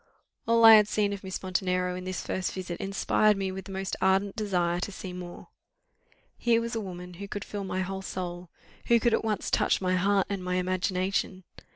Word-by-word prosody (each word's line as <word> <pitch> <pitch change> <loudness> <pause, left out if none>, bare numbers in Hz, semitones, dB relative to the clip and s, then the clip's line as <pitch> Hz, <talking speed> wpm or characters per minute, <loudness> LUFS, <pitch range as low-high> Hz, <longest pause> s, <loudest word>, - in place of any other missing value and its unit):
All 230 0 +5
I 225 - +11
had 210 -1 +7
seen 205 -1 0
of 200 - -7
Miss 190 0 -5
Montenero 180 -1 0
in 180 0 -6
this 185 -1 -4
first 185 -1 -2
visit 180 -2 -5
inspired 200 +1 +2
me 190 -1 -2
with 190 0 -7
the 195 - -9
most 190 0 -3
ardent 195 +1 +2
desire 175 -5 0
to 195 - -4
see 190 -1 -7
more. 180 -1 -9 0.9
Here 235 -1 +3
was 235 0 -3
a 225 - -1
woman 180 -2 -8
who 200 - -5
could 200 0 -5
fill 205 -1 -5
my 185 0 -2
whole 190 +1 -4
soul; 180 -2 -5 0.4
who 235 0 +5
could 235 +1 +2
at - - +1
once 215 -2 -2
touch - - +2
my 185 -1 0
heart 195 +1 +2
and 200 -2 -4
my 180 0 -1
imagination. 185 +1 -1
190 Hz, 210 wpm, -28 LUFS, 180-205 Hz, 0.9 s, I